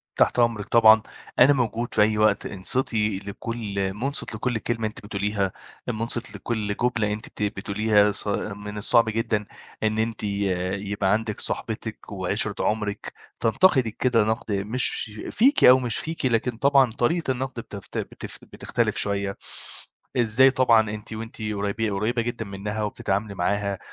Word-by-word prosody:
تحت - - +3
أمرِك 115 -4 +2
طبعًا، 110 -1 +7 0.4
أنا 130 +4 +7
موجود 120 -2 -1
في - - +3
أي 105 0 +3
وقت. 105 -1 +3
انصتي 105 0 +1
لكل 100 -1 -4
مُنصت 125 +2 -2
لكل 115 +2 -1
كلمة 115 0 -2
أنتِ 105 -1 -10
بتقوليها، 100 -1 -1 0.4
مُنصت 115 0 -2
لكل 105 -3 -3
جملة 115 -4 +1
أنتِ 105 - -7
بت - - -5
بتقوليها. 105 +1 +2
ص 105 - -3
من 105 0 -3
الصعب 110 +2 +3
جدًا 110 -1 -1 0.4
إن 110 0 +1
أنتِ 110 0 -2
يبقى 100 0 -1
عندِك 110 0 -2
صاحبتِك - - -4
وعشرة - - 0
عمرِك 105 -1 -2 0.3
تنتقدِك 115 - +3
كده 120 -4 +3
نقد 110 0 -2
مش 105 +3 0 0.2
فيكِ 270 +6 +3
أو 130 +1 +9
مش 120 -4 -1
فيكِ، 160 -2 -4
لكن 120 -1 +1
طبعًا 135 -1 +4
طريقة 135 +6 0
النقد 130 -1 -4
بتف 100 -4 -9
بتف - - -6
بتختلف - - -1
شويّة. 100 -1 0 0.8
إزاي 125 +3 +5
طبعًا 115 -5 +4
أنتِ 105 +1 -7
وأنتِ 110 +1 -7
قريبة 105 +1 -2
قريبة 110 +5 0
جدًا 120 -1 -4
منها 105 +2 -4
وبتتعاملي 100 0 -2
معاها 100 +1 -1
110 Hz, 145 wpm, -24 LUFS, 100-120 Hz, 0.8 s, أو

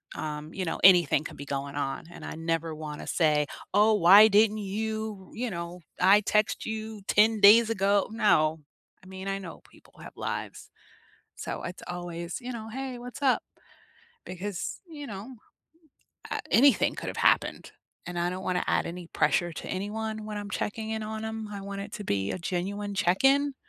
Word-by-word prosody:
Um, 150 +1 -5
you 190 - -3
know, 165 - -3
anything 175 -6 +6
can - - -8
be 145 - -8
going 140 0 -4
on 145 +2 -3
and - - -10
I - - -5
never 165 0 -2
wanna 150 -1 -7
say, 150 -3 +2 0.3
"Oh, 210 +2 +5
why 200 +3 +8
didn't 215 +1 +4
you" 215 -1 -4
you 245 0 -3
know, 170 0 -6 0.2
"I 195 +3 +6
text 210 +1 +1
you 220 -1 -5
10 215 +1 +4
days 220 +3 +8
ago." 200 -2 +2
No. 170 -8 +2 0.4
I - - -15
mean, 190 +1 -8
I 195 0 -1
know 175 -4 -9
people - - -22
have - - -10
lives, - - -5 0.7
so, - - -5
it's 175 +1 -7
always, 175 +1 -5
you 250 0 -6
know, 220 -2 -7
"Hey, 260 +1 -5
what's 245 +3 -9
up?" 265 -2 +3 0.8
Because, 185 +1 -5
you 295 -3 -8
know, 215 +4 -8 1.0
a - - -2
anything 270 -1 +5
could've - - -5
happened, - - +2 0.4
and 175 -1 -5
I 175 0 +1
don't 185 +1 -5
want 180 -1 0
to - - -4
add - - +1
any 175 +1 -7
pressure 175 0 +1
to - - -7
anyone 215 +3 -4
when 210 -1 -5
I'm 205 0 -7
checking 220 +2 -3
in 220 0 -2
on 220 0 -5
'em. 220 0 -4
I 200 - -6
want 200 0 -5
it 205 +1 -9
to 205 - -6
be 100 - -1
a - - -4
genuine 200 +4 -3
check-in, 270 +11 +3
200 Hz, 180 wpm, -28 LUFS, 175-220 Hz, 1.0 s, why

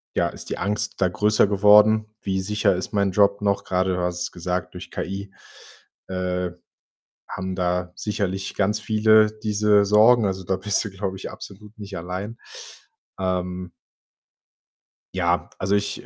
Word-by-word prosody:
ja - - +2
ist - - -9
die - - -3
Angst 105 +1 -2
da 90 - +4
größer 105 +2 +3
geworden. 105 +2 +5 0.2
Wie 95 -1 -1
sicher 105 0 +1
ist 90 - -5
mein 100 -1 +2
Job 100 +1 +3
noch? 100 -1 0
Gerade, 95 0 0
du 90 - -2
hast 90 0 -2
es - - -3
gesagt, 90 0 -3
durch - - -9
KI, 100 0 -5 0.8
äh, 90 -1 -2 0.8
haben 95 -1 -5
da 90 -1 -1
sicherlich 100 -2 -3
ganz 105 +2 +1
viele 110 0 +4
diese 105 -1 +3
Sorgen, 110 +3 +5
also, 95 -1 -2
da 95 +1 0
bist 105 +2 0
du, - - -4
glaube 95 0 -4
ich, - - -7
absolut 105 +2 -12
nicht 100 -2 -8
allein. 95 +6 -5 0.8
Ähm 90 -1 -2 1.4
ja, - - 0
also 95 +2 0
ich, 100 0 -2
100 Hz, 155 wpm, -23 LUFS, 95-105 Hz, 1.4 s, geworden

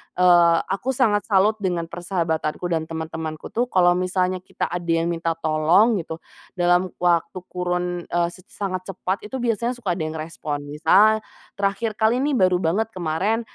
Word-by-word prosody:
eee, 175 -2 +5
aku 255 +7 -1
sangat 215 -5 +2
salut 210 +1 +3
dengan 180 -4 -1
persahabatanku, 170 -3 -2
dan 160 -1 -1
teman-temanku 160 -1 -5
tuh 240 +2 +1
kalau 180 -5 +4
misalnya 185 0 0
kita 185 - -4
ada 175 -1 -4
yang 165 0 +1
minta 165 -1 -1
tolong 165 +8 +3
gitu, 160 0 -7 0.3
dalam 175 +1 +3
waktu 175 +1 +1
kurun, 180 -1 -2
eee, 170 0 0
set 185 +1 -15
sangat 185 -2 -4
cepat 185 +1 -2
itu 265 - -7
biasanya 235 0 0
suka 220 -7 -3
ada 160 - -3
yang 155 - -6
respon. 155 -2 -4
Misal 195 +9 +4 0.4
terakhir 200 +2 -1
kali 220 +3 +3
nih, 290 -1 +1
baru 185 -4 +3
banget 205 +7 0
kemarin, 185 +6 -1
180 Hz, 165 wpm, -23 LUFS, 165-200 Hz, 0.4 s, eee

